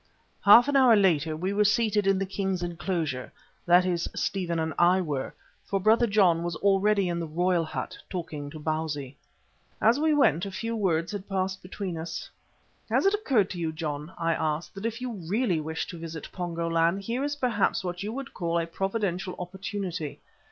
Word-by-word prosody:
Half 230 Hz, +5 st, +8 dB
an 285 Hz, -, 0 dB
hour 255 Hz, -4 st, +7 dB
later 165 Hz, -6 st, +2 dB
we 185 Hz, +4 st, -2 dB
were 210 Hz, +1 st, +3 dB
seated 210 Hz, -1 st, +2 dB
in 195 Hz, -1 st, +4 dB
the 195 Hz, -, -1 dB
king's 190 Hz, -2 st, -2 dB
enclosure, 165 Hz, -6 st, -3 dB, 0.4 s
that 175 Hz, +1 st, +6 dB
is, 175 Hz, -2 st, -1 dB
Stephen 180 Hz, -4 st, -1 dB
and 160 Hz, 0 st, -1 dB
I 180 Hz, +2 st, +5 dB
were, 145 Hz, -7 st, -3 dB, 0.3 s
for 195 Hz, -, -1 dB
Brother 220 Hz, +4 st, +4 dB
John 190 Hz, -6 st, +4 dB
was 170 Hz, -1 st, -3 dB
already 200 Hz, +1 st, +2 dB
in 170 Hz, -1 st, -1 dB
the 165 Hz, -, -3 dB
royal 175 Hz, +2 st, +1 dB
hut, 155 Hz, -, -5 dB
talking 155 Hz, -5 st, -5 dB
to 155 Hz, -, -9 dB
Bausi. 150 Hz, -3 st, -3 dB, 0.6 s
As 230 Hz, +5 st, +4 dB
we 310 Hz, 0 st, +3 dB
went 205 Hz, -, +3 dB
a -, -, -4 dB
few 230 Hz, +4 st, -3 dB
words 175 Hz, -5 st, 0 dB
had 205 Hz, -1 st, -6 dB
passed 190 Hz, -1 st, -1 dB
between 180 Hz, -2 st, -5 dB
us. 165 Hz, +1 st, -6 dB, 0.6 s
"Has -, -, +2 dB
it 390 Hz, -, +4 dB
occurred 265 Hz, -, +2 dB
to 180 Hz, -, -5 dB
you, 165 Hz, -2 st, -1 dB
John," 155 Hz, -1 st, -4 dB
I 165 Hz, 0 st, +1 dB
asked, 155 Hz, 0 st, -2 dB
"that 195 Hz, +3 st, -3 dB
if 230 Hz, +2 st, -5 dB
you 250 Hz, -1 st, -3 dB, 0.2 s
really 210 Hz, -5 st, +1 dB
wish 160 Hz, +1 st, -3 dB
to 170 Hz, -, -7 dB
visit 165 Hz, -2 st, -7 dB
Pongo 170 Hz, -2 st, -3 dB
land 165 Hz, +4 st, +1 dB
here 235 Hz, +6 st, -2 dB
is 290 Hz, 0 st, -1 dB
perhaps 240 Hz, -9 st, +1 dB
what 180 Hz, 0 st, -4 dB
you 210 Hz, +2 st, -3 dB
would 275 Hz, +3 st, -6 dB
call 170 Hz, -1 st, -1 dB
a 165 Hz, -, -1 dB
providential 190 Hz, 0 st, -2 dB
opportunity. 185 Hz, -3 st, -5 dB
185 Hz, 195 wpm, -27 LUFS, 165-205 Hz, 0.6 s, Half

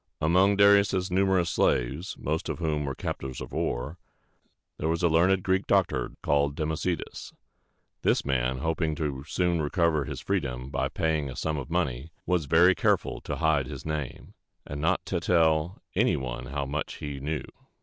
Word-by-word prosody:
Among 90 Hz, +6 st, +4 dB
Darius' 100 Hz, -2 st, +4 dB
numerous 95 Hz, -2 st, +2 dB
slaves, 65 Hz, +9 st, 0 dB
most 80 Hz, +2 st, -2 dB
of -, -, -2 dB
whom 75 Hz, -3 st, -1 dB
were 70 Hz, -1 st, -3 dB
captives 65 Hz, -2 st, -5 dB
of -, -, -7 dB
war, 65 Hz, +8 st, -2 dB, 0.8 s
there 80 Hz, -, 0 dB
was 85 Hz, +2 st, -1 dB
a -, -, +6 dB
learned 90 Hz, +3 st, +3 dB
Greek 95 Hz, +1 st, +1 dB
doctor -, -, +1 dB
called 70 Hz, 0 st, +2 dB
Dem 80 Hz, +1 st, -1 dB
o -, -, -1 dB
ce´des. 85 Hz, +2 st, -4 dB, 0.7 s
This -, -, +2 dB
man, 65 Hz, -1 st, 0 dB
hoping 80 Hz, +2 st, -1 dB, 0.3 s
soon 90 Hz, +1 st, 0 dB
to -, -, 0 dB
recover 80 Hz, -1 st, +1 dB
his -, -, -5 dB
freedom 65 Hz, +2 st, -2 dB
by 65 Hz, -, -1 dB
paying 80 Hz, -3 st, -1 dB
a 65 Hz, -, -7 dB
sum 80 Hz, -1 st, -2 dB
of 70 Hz, 0 st, -5 dB
money, 80 Hz, -5 st, -1 dB, 0.2 s
was 90 Hz, -4 st, +1 dB
very 85 Hz, +6 st, +5 dB
careful -, -, 0 dB
to -, -, -4 dB
hide 80 Hz, -5 st, +1 dB
his -, -, -8 dB
name, 75 Hz, -4 st, -5 dB, 0.3 s
and 75 Hz, 0 st, -5 dB
not 80 Hz, -, +1 dB
to -, -, -1 dB
tell 80 Hz, +1 st, +2 dB
any -, -, +2 dB
one 65 Hz, -1 st, -5 dB
how 70 Hz, 0 st, -3 dB
much 70 Hz, +2 st, -3 dB
he 70 Hz, -2 st, -6 dB
knew. 75 Hz, +3 st, -3 dB
80 Hz, 175 wpm, -27 LUFS, 70-90 Hz, 0.8 s, a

